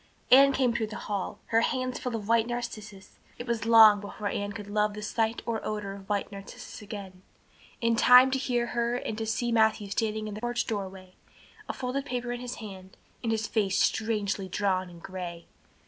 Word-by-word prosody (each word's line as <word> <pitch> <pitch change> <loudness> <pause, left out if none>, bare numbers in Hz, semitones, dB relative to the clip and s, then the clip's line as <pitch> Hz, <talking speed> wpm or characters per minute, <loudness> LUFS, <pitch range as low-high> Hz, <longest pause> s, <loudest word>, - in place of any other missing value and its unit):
Anne 275 +2 +8
came 260 -3 +1
through 230 -2 -1
the 215 - -8
hall, 205 0 -3 0.2
her 225 - +5
hands 255 +1 -1
full 250 -3 -3
of 210 -2 -5
white 230 0 +3
narcissus, 215 -5 -6 0.2
it 240 - -6
was 230 -2 -2
long 220 -2 +8
before 205 0 -5
Anne 205 0 -3
could 210 -1 -7
love 210 0 0
the 210 - -6
sight 225 +1 -1
or 225 -2 -2
odor 210 -2 -3
of 195 0 -12
white 205 0 -1
narcissus 200 +2 -9
again, 200 -3 -8 0.6
in 230 -1 +2
time 250 +3 +7
to 265 - +1
hear 245 -2 0
her 235 0 0
and 235 -3 -3
to 220 0 -4
see 235 +2 -1
Matthew 220 -3 +2
standing 215 +1 -1
in 210 - -5
the 210 - -7
porch 240 0 -1
doorway, 190 -3 -5 0.6
a - - -1
folded 265 +2 -3
paper 245 -3 -3
in 245 0 -4
his 250 0 -5
hand, 190 -3 -10 0.2
and 230 - -1
his 220 0 0
face 200 -4 0
strangely 210 -3 0
drawn 185 -1 0
and 170 -1 -14
gray. 175 -3 -6
220 Hz, 200 wpm, -28 LUFS, 200-235 Hz, 0.6 s, Anne